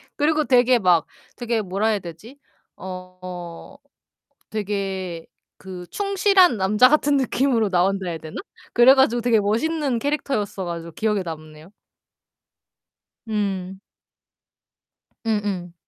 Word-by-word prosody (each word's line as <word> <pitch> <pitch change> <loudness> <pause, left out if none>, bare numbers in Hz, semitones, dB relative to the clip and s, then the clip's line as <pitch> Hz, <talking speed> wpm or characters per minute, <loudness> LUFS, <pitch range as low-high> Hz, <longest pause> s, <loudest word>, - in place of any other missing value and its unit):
그리고 305 0 +1
되게 250 -1 +4
막 180 -5 +3 0.3
되게 235 -2 -1
뭐라 195 +3 -1
해야 215 -2 +1
되지? 180 - -11 0.4
어 185 +2 -9 0.7
되게 195 -5 -4 0.3
그 180 -2 -9
충실한 395 - +3
남자 210 +6 +4
같은 290 -1 +3
느낌으로 255 -4 +1
나온다 190 +1 +1
해야 165 -1 -3
되나? 155 0 -10 0.4
그래 245 +3 +7
가지고 240 -3 +3
되게 235 -2 +3
멋있는 255 +5 0
캐릭터였어 265 -9 -2
가지고 170 -1 -6
기억에 210 -3 0
남네요. 155 0 -9 1.6
음. 195 -3 -3 1.5
음음. 205 -5 -2
205 Hz, 240 characters per minute, -22 LUFS, 185-250 Hz, 1.6 s, 그래